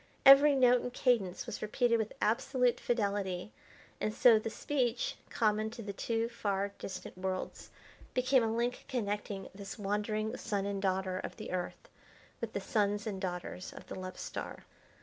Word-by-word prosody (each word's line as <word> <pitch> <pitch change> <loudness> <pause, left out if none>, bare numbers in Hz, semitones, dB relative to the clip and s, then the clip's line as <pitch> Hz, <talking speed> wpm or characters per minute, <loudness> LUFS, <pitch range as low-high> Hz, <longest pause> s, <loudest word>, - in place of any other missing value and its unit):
Every 275 +1 +9
note 250 -2 +5
and 245 - -4
cadence 230 -8 +1
was - - -6
repeated 230 +2 +2
with 220 -1 -2
absolute 250 +3 +2
fidelity, 200 -4 -1 0.5
and 215 - 0
so 225 0 +6
the 220 - -3
speech, 265 - -1
common 215 -3 +1
to 230 +1 -8
the 200 -1 -5
two 225 +3 -1
far 200 -4 -1
distant 185 -1 -7
worlds, 185 0 -4 0.5
became 255 +1 +4
a 225 - +1
link 240 +2 -1
connecting 205 -5 -3
this 195 +2 -8
wandering 210 +1 -1
son 205 -4 -2
and 200 -1 -2
daughter 190 -1 0
of - - -6
the - - -6
Earth 185 - -4 0.5
with 230 -2 -4
the - - -1
sons 205 0 0
and 195 -4 -4
daughters 180 0 -4
of - - -11
the - - -5
Love 185 0 -6
Star. - - -6
215 Hz, 165 wpm, -33 LUFS, 195-240 Hz, 0.5 s, Every